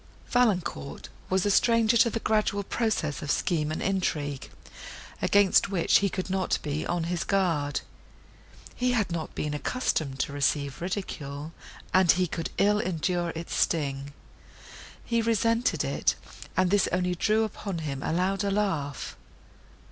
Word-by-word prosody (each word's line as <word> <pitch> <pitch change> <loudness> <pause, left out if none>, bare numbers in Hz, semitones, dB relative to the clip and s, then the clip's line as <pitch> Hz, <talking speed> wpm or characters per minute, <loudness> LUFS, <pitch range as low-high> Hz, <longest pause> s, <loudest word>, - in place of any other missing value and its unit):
Valancourt 180 - 0 0.2
was 190 0 +1
a 205 - +3
stranger 230 +1 +4
to 235 0 +5
the 225 - -2
gradual 215 -2 +1
progress 200 -9 -1
of 145 - -5
scheme 155 -2 0
and 155 - -3
intrigue, 150 -8 -1 0.7
against 200 -1 +4
which 185 -4 +3
he 200 - +1
could 185 0 -4
not 190 -1 0
be 150 0 -2
on 175 -1 -1
his 170 0 -1
guard. 165 -8 0 0.9
He 250 0 0
had 215 -6 0
not 165 -2 -4
been 150 -1 -2
accustomed 150 - -1
to 145 - -3
receive 140 0 0
ridicule, 160 -5 -5 0.4
and 185 -2 +6
he 185 0 +1
could 165 -1 -4
ill 210 +1 +3
endure 175 -2 -1
its 165 +1 -5
sting; 140 -3 0 0.9
he 235 -1 +1
resented 230 +1 +1
it, - - +1 0.4
and 185 -1 +3
this 205 -1 +3
only 180 0 +1
drew 215 +5 +2
upon 200 -3 -4
him 145 -4 -4
a - - -2
louder 195 +4 0
laugh. 190 -9 -1
180 Hz, 145 wpm, -27 LUFS, 155-205 Hz, 0.9 s, and